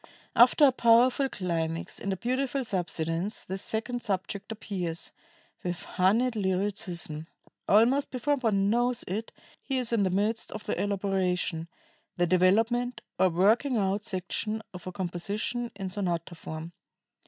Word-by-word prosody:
After 250 +5 +7
a 270 - +6
powerful 250 +3 +4
climax 165 -5 -2
and 200 - -2
a 190 - -1
beautiful 260 +4 -1
subsidence,... 175 0 -1
the 190 - -4
second 230 +4 -2
subject 200 0 -3
appears,... 185 -6 -4 0.5
with 175 -1 -3
honeyed 225 +7 +2
lyricism. 190 -5 -2 0.4
Almost 240 +7 +4
before 285 +3 0
one 205 -5 +2
knows 240 +1 +1
it 215 +5 -3 0.3
he 270 - -2
is 245 -2 0
in 225 - +3
the 190 - +2
midst 210 +5 0
of 210 - -7
the - - -1
elaboration 185 -4 0 0.5
[the 175 - +3
development, 225 +8 +2 0.2
or 190 - +5
"working 220 - +3
out" 200 0 0
section, 215 +2 -2
of 180 0 -9
a - - -3
composition 200 +6 -2
in 195 -2 -5
sonata 175 -3 -2
form]. 160 0 -7
200 Hz, 140 wpm, -28 LUFS, 180-235 Hz, 0.5 s, After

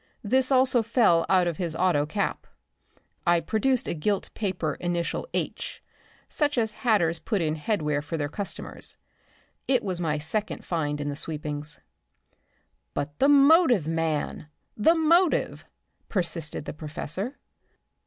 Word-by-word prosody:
This 255 +5 +2
also 255 -2 +4
fell 225 -7 +3
out 185 -2 +4
of 170 -3 -2
his 170 -3 -2
auto 165 -5 +2
cap." 200 +4 -2 0.8
I 175 0 +5
produced 235 - 0
a - - -1
gilt 190 +5 -1
paper 180 -7 -2
initial 175 - -2
"H," - - -3 0.5
such 295 -2 0
as 220 -2 +1
hatters 175 -9 +2
put 210 -4 -1
in 155 -2 0
headwear 150 -4 -1
for 160 +2 -4
their 145 -2 -1
customers. 195 +7 -5 0.7
It 255 -2 +2
was 185 -3 -3
my 155 -3 0
second 205 +8 -3
find 150 -4 -1
in 145 0 -2
the 145 - -3
sweepings. 150 -1 -4 1.2
"But 145 +1 -4
the 275 - +4
motive, 280 - +6
man, 160 -2 -2 0.3
the 320 +11 +4
motive!" 335 +2 +2 0.4
persisted 170 -6 -2
the - - -5
professor. 165 - -4
175 Hz, 135 wpm, -26 LUFS, 155-230 Hz, 1.2 s, motive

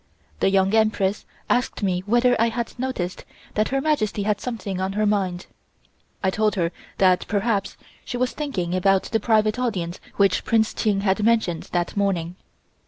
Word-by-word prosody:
The - - +3
Young 195 +1 +2
Empress 215 -3 +1 0.2
asked 250 -3 0
me 180 -2 +1
whether 240 +3 +4
I 230 - +4
had 235 0 -4
noticed 240 -9 -3 0.3
that 215 0 +1
Her 270 - 0
Majesty 215 -9 0
had 205 0 0
something 210 -6 -4
on 190 +1 -1
her 215 +1 +1
mind. 190 -4 0 0.8
I 190 - +2
told 215 +1 +1
her 170 -3 0 0.3
that 185 -1 +3
perhaps 205 0 -1 0.3
she 245 - -4
was 255 0 0
thinking 195 - -3
about 190 +1 +3
the 225 - -1
private 215 0 +2
audience 185 -8 -2 0.2
which 195 -2 +3
Prince 220 -1 +2
Ching 205 -3 0
had 195 +1 +1
mentioned 220 -7 +1
that 175 -1 -1
morning. 180 -4 0
205 Hz, 170 wpm, -23 LUFS, 190-225 Hz, 0.8 s, whether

